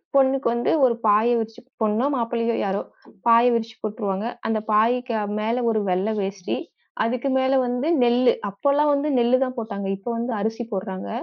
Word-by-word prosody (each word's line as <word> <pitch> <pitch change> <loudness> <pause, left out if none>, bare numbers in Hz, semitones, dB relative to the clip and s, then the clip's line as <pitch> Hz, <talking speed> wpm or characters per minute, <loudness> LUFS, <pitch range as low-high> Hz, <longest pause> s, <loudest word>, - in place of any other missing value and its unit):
பொண்ணுக்கு 270 -1 +3
வந்து 235 0 0
ஒரு 240 -2 +2
பாய 210 +2 +4
விரிச்சு, 225 0 -6 0.2
பொண்ணோ, 220 +3 +1
மாப்பிள்ளையோ 230 -1 -1
யாரோ 195 0 -1 0.5
பாய 230 +1 +6
விரிச்சு 230 -1 -2
போட்டுருவாங்க. 210 -2 -3 0.2
அந்தப் 220 -1 -2
பாயக்கு 235 +3 +2 0.3
மேல 230 +3 -1
ஒரு 220 - 0
வெள்ளை 190 +4 0
வேஷ்டி. 195 -1 -3 0.5
அதுக்கு 250 +3 -1
மேல 260 +1 +1
வந்து 245 +4 -1 0.2
நெல்லு. 245 +1 +4 0.2
அப்பல்லாம் 285 +8 +2
வந்து 285 +2 0
நெல்லு 240 +2 +4
தான் 255 0 -6
போட்டாங்க. 200 -3 -5
இப்போ 195 +5 -7
வந்து 235 +1 -2
அரிசி 225 +3 -2
போட்றாங்க. 190 -1 -4
230 Hz, 160 wpm, -23 LUFS, 215-250 Hz, 0.5 s, பாய